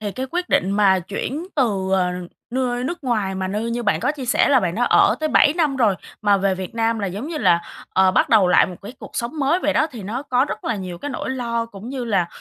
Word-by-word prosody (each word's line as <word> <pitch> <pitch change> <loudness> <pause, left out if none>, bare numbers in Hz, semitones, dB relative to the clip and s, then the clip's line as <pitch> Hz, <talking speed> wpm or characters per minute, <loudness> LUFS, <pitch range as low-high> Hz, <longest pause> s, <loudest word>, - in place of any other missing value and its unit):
thì 205 -2 -4
cái 260 +4 -4
quyết 355 +1 -2
định 190 - +2
mà 200 -2 +4
chuyển 235 - -4
từ, 200 -8 0
ờ, 185 -2 +2 0.4
nưa 245 -1 -1
nước 340 +4 -4
ngoài 215 -6 0
mà 190 0 -3
nơi 215 +4 -2
như 240 +1 -2
bạn 200 -8 +1
có 295 - +1
chia 285 -4 -7
sẻ 250 - +2
là 265 -3 +5
bạn 180 -4 -1
đã 245 +4 +1
ở - - +4
tới 310 - 0
7 290 - +5
năm 310 -5 0
rồi 225 -6 +3 0.3
mà 205 -1 +4
về 195 0 +1
Việt 185 +2 -7
Nam 230 0 0
là 200 - -2
giống 200 +8 -5
như 325 - -4
là, 170 -11 +3 0.3
ờ, 190 0 +4
bắt - - +2
đầu 205 -5 +5
lại 180 - +5
một 180 - -8
cái 205 +5 -8
cuộc - - -10
sống 240 +7 -3
mới 290 +5 +2
vậy 300 -5 0
đó, 310 - +2
thì 235 -6 -8
nó 225 +7 -4
có 255 -2 +1
rất - - -6
là 225 - -1
nhiều 180 -3 -6
cái 290 - -5
nỗi 265 - -4
lo 235 -3 -2
cũng 210 0 -10
như 260 -1 -4
là, 195 -7 +1
230 Hz, 275 wpm, -21 LUFS, 195-260 Hz, 0.4 s, là